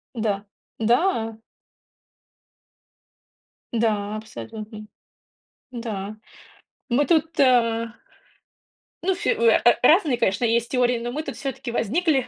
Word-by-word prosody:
Да. 210 -3 -1 0.3
Да? 230 - +1 2.3
Да, 215 -3 0
абсолютно. 215 0 -8 0.9
Да, 215 -4 -5 0.7
мы 265 +4 +2
тут 320 0 +1
э 230 -3 +3 1.2
ну 380 +1 +1
всё, 405 +6 0
э, 470 0 +5
э, - - +5
разные, 315 -6 +5
конечно, 205 0 +1
есть 230 0 +1
теории, 250 -2 +2
но 240 +1 -4
мы-то 305 +4 -4
всё-таки 270 -3 -5
возникли. 265 - +1
235 Hz, 100 wpm, -23 LUFS, 220-275 Hz, 2.3 s, э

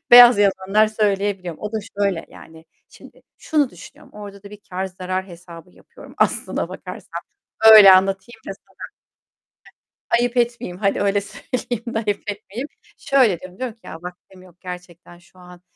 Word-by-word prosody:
beyaz 245 -2 +10
yalanlar 200 +1 +2
söyleyebiliyorum. 200 -5 -2
O 210 0 -5
da 220 - -1 0.2
şöyle 195 -5 -1
yani, 160 0 -15 0.2
şimdi - - -17 0.2
şunu 295 -5 0
düşünüyorum. - - -15
Orada 200 -1 -10
da 200 - -12
bir 210 - -11
kâr 185 +1 -3
zarar 185 0 -5
hesabı 170 -1 -13
yapıyorum - - -16
aslına - - 0
bakarsan. - - -8 0.5
Öyle 205 -3 +10
anlatayım 195 +5 +1
da - - -3
sana. - - -30 1.4
Ayıp 245 +1 -1
etmeyeyim. 235 -7 -1
Hadi 200 0 0
öyle 200 0 +1
söyleyeyim 240 +2 -5
de - - +1
ayıp 205 -2 -2
etmeyeyim. 215 +6 -8 0.3
Şöyle 250 -11 +2
diyorum, 185 0 -12
diyorum 250 -3 -4
ki 225 - -42
"Ya - - -8
vaktim 180 +1 -12
yok, 180 -1 -20
gerçekten 180 -1 -10
şu 175 +1 -23
an 180 0 -15
195 Hz, 155 wpm, -21 LUFS, 180-220 Hz, 1.4 s, beyaz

